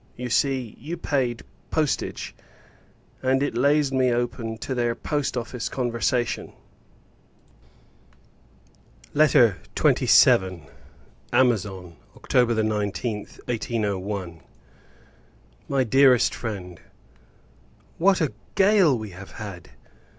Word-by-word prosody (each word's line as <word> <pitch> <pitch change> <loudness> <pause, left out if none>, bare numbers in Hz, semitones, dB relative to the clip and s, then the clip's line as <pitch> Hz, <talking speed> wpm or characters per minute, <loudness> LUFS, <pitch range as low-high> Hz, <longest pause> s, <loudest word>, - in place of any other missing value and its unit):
You 125 -1 -5
see, 130 -3 0
you 160 +7 -6
paid 130 -7 -1 0.3
postage, 155 -3 -2 0.9
and 130 +1 +2
it 145 - -2
lays 140 +3 +2
me 130 -2 +2
open 120 -2 -2
to 120 +5 -4
their 120 -2 0
Post 145 0 -2
Office 120 0 -4
conversation. 120 -1 -1 2.6
LETTER 130 -9 +4 0.2
XXVII. 95 -4 +4 0.7
Amazon, 95 -9 0 0.2
October 120 -2 +1
19th, 105 0 -2
1801. 100 -7 -3 1.3
MY 135 -1 +2
DEAREST 130 0 +4
FRIEND, 95 -6 -6 1.2
What 190 +1 +3
a 155 - 0 0.2
gale 195 - +4
we 110 -3 -7
have 95 +2 -11
had! 100 -6 -8
120 Hz, 90 wpm, -24 LUFS, 105-135 Hz, 2.6 s, LETTER